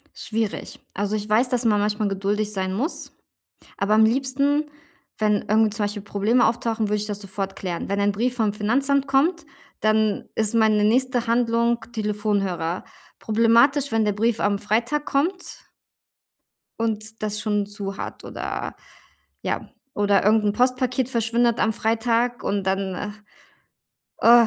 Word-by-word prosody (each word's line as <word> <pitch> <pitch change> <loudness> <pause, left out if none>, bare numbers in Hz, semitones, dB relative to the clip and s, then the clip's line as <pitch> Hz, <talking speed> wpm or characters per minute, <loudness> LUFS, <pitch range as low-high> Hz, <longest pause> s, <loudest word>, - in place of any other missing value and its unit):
Schwierig. 220 -2 -3 0.2
Also, 205 +2 -1
ich 210 0 -5
weiß, 225 +4 +3
dass 250 -1 0
man 210 -2 +3
manchmal 210 0 0
geduldig 205 +2 -1
sein 190 -2 -2
muss, 275 - -4 0.6
aber 205 +2 +2
am 220 0 +6
liebsten, 275 +5 +1 0.5
wenn 210 -1 +1
irgendwie 220 +1 +3
zum 210 0 -1
Beispiel 205 0 -5
Probleme 210 +5 +2
auftauchen, 225 -1 0
würde 210 - +1
ich 210 0 -3
das 205 -1 -4
sofort 195 -1 -5
klären. 180 -2 -4
Wenn 200 0 0
ein 200 0 +2
Brief 240 +5 -1
vom 220 -4 +1
Finanzamt 275 +7 +1
kommt, 315 +5 +2 0.3
dann 215 -1 +1
ist 220 -1 0
meine 220 -2 +3
nächste 245 +2 +2
Handlung 235 0 +1
Telefonhörer. 205 -6 -1 0.4
Problematisch, 235 +6 +3
wenn 225 -1 +2
der 210 - +2
Brief 225 +2 0
am 205 -1 +1
Freitag 235 +8 0
kommt 355 +7 -2 1.2
und 220 0 -3
das 210 0 -1
schon 210 -1 0
zu 200 -1 -6
hat - - -7
oder - - -5 0.7
ja, - - -3 0.3
oder 205 -1 +2
irgend 215 +1 +4
'n 205 - +2
Postpaket 255 +1 +1
verschwindet 235 -1 +1
am 220 - +2
Freitag 230 +2 0
und 200 -1 -1
dann, 190 +1 -2 1.1
äh 235 0 +7
220 Hz, 145 wpm, -23 LUFS, 205-240 Hz, 1.2 s, äh